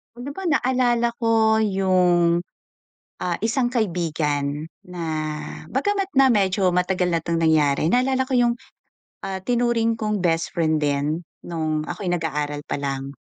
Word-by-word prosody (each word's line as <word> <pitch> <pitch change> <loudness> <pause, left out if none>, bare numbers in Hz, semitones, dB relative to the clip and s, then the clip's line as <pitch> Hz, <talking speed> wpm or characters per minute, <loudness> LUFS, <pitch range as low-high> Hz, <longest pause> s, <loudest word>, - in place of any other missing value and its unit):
Oh, 245 - -9
di 280 - -5
ba 385 +7 -7
naalala 245 -5 +2
ko 225 -2 +3
yung, 180 -4 +3 0.8
ah, 175 -1 -1
isang 240 +3 0
kaibigan 155 - -1 0.2
na 180 -1 -8 0.7
bagama't 395 +8 0
na 270 -1 +5
medyo 195 -4 +2
matagal 180 0 +1
na 170 -1 +1
'tong 170 0 -1
nangyari, 155 -1 +3
naalala 260 +3 +2
ko 265 - -4
yung, 240 -1 +3 0.7
ah, 195 -1 -4
tinuring 235 -2 +1
kong 215 -1 -2
bestfriend 165 -2 +1
din 145 +3 0 0.2
nung 155 -2 -2
ako'y 180 +1 -4
nag-aaral 150 -3 -2
pa - - -3
lang. 135 -1 -3
180 Hz, 135 wpm, -23 LUFS, 160-235 Hz, 0.8 s, na